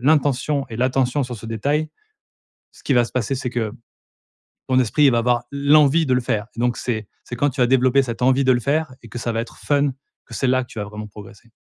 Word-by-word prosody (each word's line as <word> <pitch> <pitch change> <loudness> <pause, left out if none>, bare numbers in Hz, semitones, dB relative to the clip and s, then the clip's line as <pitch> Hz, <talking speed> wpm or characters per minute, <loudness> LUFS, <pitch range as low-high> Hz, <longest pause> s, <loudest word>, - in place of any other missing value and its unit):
l'intention 145 0 +1
et 110 - -6
l'attention 130 +2 +1
sur 125 -2 -5
ce 110 - -12
détail, 145 +8 -1 0.8
ce - - -19
qui 140 - +1
va 120 -1 +5
se - - -11
passer, 130 +2 -1
c'est 125 -1 -3
que 115 -3 -2 1.0
ton 130 -1 +3
esprit 135 +4 +3
va 120 - +2
avoir 120 0 +1
l'envie 145 +2 +4
de 130 - +2
le 125 - +2
faire. 110 -2 -2
Donc 120 +1 0
c'est 110 -4 -3 0.2
c'est - - -7
quand 145 +4 +1
tu 130 - -6
as 125 - +5
développé 130 +1 +3
cette 120 -1 -5
envie 130 +2 +3
de 130 - +5
le 120 - +1
faire 145 +2 -1
et 115 - -12
que 120 - -7
ça 120 0 -2
va 115 - -1
être 115 - -8
fun, 145 -1 +1 0.4
que - - -10
c'est 135 - -1
là 130 0 +2
que 125 - -11
tu - - -10
vas 105 - -2
vraiment 105 +1 -8
progresser. 105 +2 -14
125 Hz, 245 wpm, -21 LUFS, 115-140 Hz, 1.0 s, va